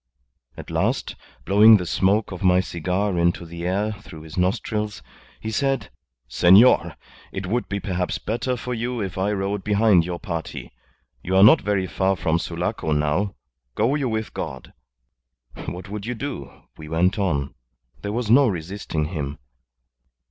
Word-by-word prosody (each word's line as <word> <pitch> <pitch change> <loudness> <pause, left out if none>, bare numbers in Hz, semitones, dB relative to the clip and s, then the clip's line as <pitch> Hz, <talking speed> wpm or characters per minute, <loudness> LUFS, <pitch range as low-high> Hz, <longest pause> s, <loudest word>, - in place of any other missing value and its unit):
At - - -9
last, - - -1 0.3
blowing 105 +3 +7
the 90 - -4
smoke 100 +5 +1
of 90 - -7
my 90 -1 +4
cigar 90 +2 -1
into 85 0 +1
the 85 +1 -6
air 100 +4 0
through 95 -6 -11
his 80 -2 -10
nostrils, 105 +3 -1 0.4
he 110 - -5
said, 135 +3 -1 0.4
'Senor, 100 +8 +5 0.4
it 95 - -5
would 120 +6 -2
be 100 - -2
perhaps 90 -1 -2
better 125 +3 -2
for 125 +2 -4
you 120 +1 -3
if 95 -3 -4
I 100 +2 +1
rode 100 -1 -2
behind 105 -3 +4
your 90 +1 -4
party. 85 -3 -5 0.5
You 95 +2 -2
are 95 - +7
not 145 +9 +8
very 100 -2 0
far 95 +3 0
from 85 -2 0
Sulaco 80 -2 -2
now. 75 +7 0 0.4
Go 115 +6 +2
you 140 -4 0
with 110 -1 -3
God.' 65 -1 -6 0.9
What 90 +3 -6
would 105 +1 -6
you? 120 - -6 0.2
We 75 -1 -9
went 90 +6 +1
on. 70 -8 -1 0.5
There 100 - -4
was 120 +1 -2
no 135 +2 +6
resisting 85 -4 -3
him. 75 -4 -4
95 Hz, 155 wpm, -23 LUFS, 85-110 Hz, 0.9 s, not